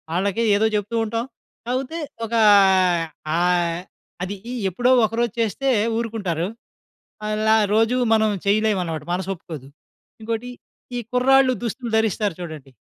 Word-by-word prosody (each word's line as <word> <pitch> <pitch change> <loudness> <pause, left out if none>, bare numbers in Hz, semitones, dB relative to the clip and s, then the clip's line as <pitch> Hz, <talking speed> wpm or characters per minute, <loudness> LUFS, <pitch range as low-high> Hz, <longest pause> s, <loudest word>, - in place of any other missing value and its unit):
ఆళ్ళకే 200 +4 0
ఏదో 215 +2 +2
చెప్తూ 210 +2 -2
ఉంటాం. 230 +2 -2 0.4
కాపోతే, 260 +6 -3 0.3
ఒకా 230 +1 0 1.0
ఆహ్, 175 -1 +1 0.4
అది 195 +2 -4 0.2
ఈ - - -4 0.2
ఎప్పుడో 245 +8 +1
ఒకరోజు 230 0 -1
చేస్తే 230 +5 0 0.3
ఊరుకుంటారు. 205 -8 -2 0.8
అలా 215 +1 +2 0.2
రోజు 225 +3 +3 0.2
మనం 220 -1 +3 0.2
చెయ్యలేవనమాట. 200 -7 +1
మనసొప్పుకోదు. 175 -6 -5 0.5
ఇంకోటి, 230 +2 -3 0.5
ఈ - - -1
కుర్రాళ్ళు 260 +1 +4
దుస్తులు 235 0 -4
ధరిస్తారు 210 -4 0
చూడండి. 150 -5 -9
215 Hz, 110 wpm, -22 LUFS, 180-235 Hz, 1.0 s, కుర్రాళ్ళు